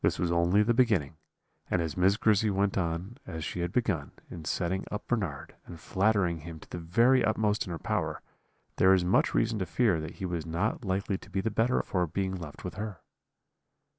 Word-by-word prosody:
"This - - +2
was 85 -1 0
only 85 +4 +4
the 120 +3 +2
beginning; 105 - +2 0.5
and 90 - +1
as 80 -3 -2
Miss 95 +3 +3
Grizzy 110 -1 +3
went 100 0 +1
on 90 +5 -2
as 80 -1 -5
she 90 - -4
had 85 0 -1
begun, 95 - -1 0.2
in 80 -3 -8
setting 90 +4 -1
up 105 - -4
Bernard, 90 - -2
and 85 - -9
flattering 95 -1 +1
him 80 0 -9
to - - -15
the 90 - -4
very 115 +10 +4
utmost 105 -1 +1
in - - -5
her 85 - -3
power, - - -2 0.5
there 95 +1 +6
is 90 -2 +1
much 90 - +2
reason 110 -1 +1
to 95 - -1
fear 105 -3 +2
that 80 - -7
he 95 - -5
was 85 -3 -2
not 85 +9 -2
likely 95 0 -1
to - - -15
be 95 0 -2
the 110 +3 -1
better 115 +4 +2
for 90 -2 0
being 95 +3 -2
left 85 -5 -8
with 90 - -6
her. 105 -5 -6
95 Hz, 210 wpm, -29 LUFS, 85-105 Hz, 0.5 s, there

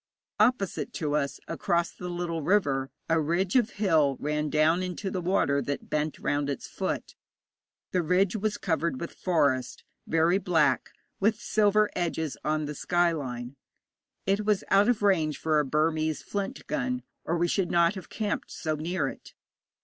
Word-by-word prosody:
Opposite 215 -3 +1
to 150 -2 -1
us, 140 -2 -1
across 170 0 0
the 180 - -7
little 175 -2 -3
river, 140 -7 +1 0.2
a 165 -1 +2
ridge 175 - 0
of 245 -3 +4
hill 155 -10 +3
ran 150 +1 -1
down 155 +4 +3
into 185 +2 -3
the 185 - -2
water 170 -6 +2
that 145 +2 -4
bent 150 0 -1
round 145 0 -1
its 140 - -4
foot. - - -4 0.8
The 180 - +2
ridge 180 +4 +2
was 215 0 -1
covered 165 -5 -1
with 170 - -5
forest, 140 -8 0 0.2
very 165 +4 +3
black, 150 - +2 0.3
with 215 +2 +2
silver 210 -1 +3
edges 160 -4 -1
on 155 0 0
the 150 - -4
sky 175 +3 +2
line. 125 -4 -5 0.7
It 195 +2 +1
was 210 -2 +1
out 200 +3 +5
of 230 -4 +1
range 160 -7 +2
for 155 -1 +2
a 150 - +1
Burmese 155 +2 0
flint 205 +6 -4
gun, 255 -4 -2 0.2
or 170 - -1
we 175 +1 +2
should 180 0 0
not 170 +1 +4
have 190 -2 -9
camped 210 -2 -3
so 155 -2 -3
near 160 0 -1
it. - - -9
170 Hz, 165 wpm, -28 LUFS, 150-195 Hz, 0.8 s, out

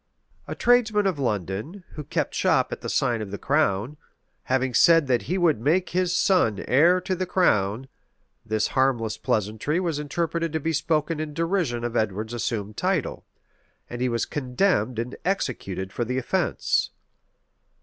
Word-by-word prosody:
A - - -5
tradesman 225 -4 +3
of 185 -7 0
London, 110 - -3
who 150 - -7
kept - - -2
shop - - +2
at - - -5
the - - -4
sign 120 -4 +1
of 105 - -5
the 100 - -5
Crown, 135 -2 0 0.5
having 130 0 0
said 165 +5 +5
that 125 -3 +1
he 185 - +1
would 165 - +2
make 175 +8 +1
his 180 0 0
son 145 - +2
heir 170 +8 +5
to 185 +1 -2
the 185 0 -3
crown; 110 - +1 0.6
this 110 0 -1
harmless 125 -5 +1
pleasantry 110 - -1
was 165 -5 -1
interpreted 165 +2 -2
to 160 - 0
be 160 +2 -2
spoken 155 +1 0
in 155 -1 -5
derision 165 -8 -1
of 120 0 -3
Edward's 110 +1 -1
assumed 110 -3 -3
title; 185 -5 -1 0.6
and 120 0 -5
he 125 - +1
was 115 -1 -1
condemned 130 - 0
and 120 +3 -3
executed 100 - -3
for 120 - -1
the 125 +2 -3
offence. 130 - 0
135 Hz, 160 wpm, -25 LUFS, 115-170 Hz, 0.6 s, said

